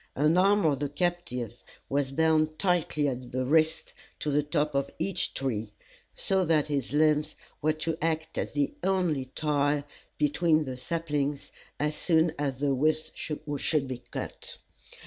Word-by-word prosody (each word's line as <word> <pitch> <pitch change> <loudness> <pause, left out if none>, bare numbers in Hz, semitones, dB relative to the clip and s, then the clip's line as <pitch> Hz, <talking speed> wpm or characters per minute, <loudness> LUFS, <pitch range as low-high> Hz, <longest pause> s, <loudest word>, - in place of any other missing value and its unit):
An 150 +4 +3
arm 200 +1 +4
of 145 -4 +2
the 145 -1 -1
captive 145 - -2 0.2
was 140 -1 0
bound 155 +1 +2
tightly 170 -5 +1
at 125 -2 -4
the 130 0 -1
wrist 160 +3 +2 0.2
to 150 - -2
the 145 +1 +3
top 150 0 0
of 140 0 0
each 195 -2 -1
tree, 110 -6 -2 0.4
so 190 -1 +1
that 155 -3 +3
his 140 -5 -2
limbs 150 0 +2 0.3
were 155 +1 +3
to 160 +1 -3
act 160 0 -1
as - - -3
the 145 -1 0
only 180 -8 +1
tie 145 -1 +1 0.3
between 155 +1 +3
the 130 -1 -4
saplings, 145 0 -2 0.3
as 150 +1 0
soon 160 0 +3
as 140 -3 -1
the 140 0 +1
withes 155 +3 +1
should 150 -1 -1
be 130 -2 -5
cut. - - -5
150 Hz, 155 wpm, -28 LUFS, 140-160 Hz, 0.4 s, arm